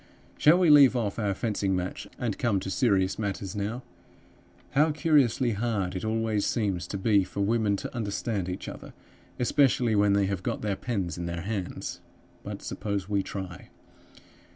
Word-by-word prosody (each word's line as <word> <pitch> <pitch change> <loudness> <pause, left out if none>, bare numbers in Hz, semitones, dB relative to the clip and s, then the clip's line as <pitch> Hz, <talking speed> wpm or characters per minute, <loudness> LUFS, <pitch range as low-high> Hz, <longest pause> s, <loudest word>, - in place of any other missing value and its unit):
"Shall 155 +4 +6
we 180 -4 +5
leave 140 -3 +8
off 110 -3 -1
our 100 -3 0
fencing 100 -3 -1
match 90 0 -4
and 115 -5 -3
come 115 -6 +1
to 95 - -4
serious 95 -5 +2
matters 100 -1 -3
now? 105 +5 -3 0.9
How 150 +3 +4
curiously 140 -5 +2
hard 105 -4 -1
it 90 - -4
always 110 -1 0
seems 100 -6 -1
to 100 - -4
be 100 0 +3
for 100 - -5
women 105 0 +2
to 100 - -6
understand 105 -3 -2
each 90 - -5
other, - - -9 0.4
especially 125 -2 +3
when 100 -1 +4
they 100 0 +3
have 95 -2 -2
got - - -3
their 105 -2 0
pens 95 -8 -3
in 85 - -3
their 85 0 -4
hands! 100 -1 -4 0.4
But - - -7
suppose 100 -3 -3
we 100 -1 +1
try. 95 -2 -7
105 Hz, 170 wpm, -27 LUFS, 95-120 Hz, 0.9 s, leave